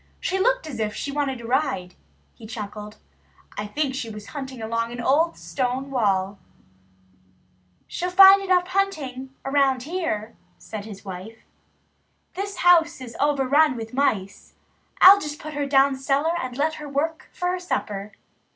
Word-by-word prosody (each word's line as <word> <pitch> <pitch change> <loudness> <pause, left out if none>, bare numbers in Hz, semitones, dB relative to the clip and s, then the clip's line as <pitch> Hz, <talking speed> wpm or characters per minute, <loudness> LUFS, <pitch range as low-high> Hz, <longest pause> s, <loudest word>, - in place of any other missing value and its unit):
"She 380 +1 -1
looked - - +2
as 270 -7 -7
if 215 -1 -2
she 285 - -4
wanted 275 -4 -2
a - - -9
ride," 235 -8 -1 0.4
he 225 - -13
chuckled. 210 -1 -7 0.6
"I 205 0 -4
think 280 +5 -2
she 255 -3 -4
was 210 -1 -9
hunting 265 -4 -7
along 230 +1 -2
an 240 - -7
old 305 +7 +2
stone 260 +1 -3
wall." 200 -5 0 1.5
"She'll 360 - -3
find 390 +1 +7
hunting 360 -8 0 0.2
enough 270 -2 +2
here," 265 - -3 0.2
said 210 -2 -8
his 210 -2 -10
wife. 195 +4 -9 0.9
"This 400 +1 -4
house 335 -3 +5
is 245 -3 -9
overrun 285 0 +3
with 225 0 -7
mice. 210 -8 -1 0.5
I'll 395 +2 +10
just 300 0 -5
put 310 0 -8
her 285 -1 -2
down 275 0 +4
cellar 275 +4 0
and 255 -1 -6
let 310 +2 +1
her 295 - -7
work 315 +4 -2
for 355 - -2
her 365 0 -1
supper." 210 - -4
270 Hz, 150 wpm, -24 LUFS, 225-315 Hz, 1.5 s, I'll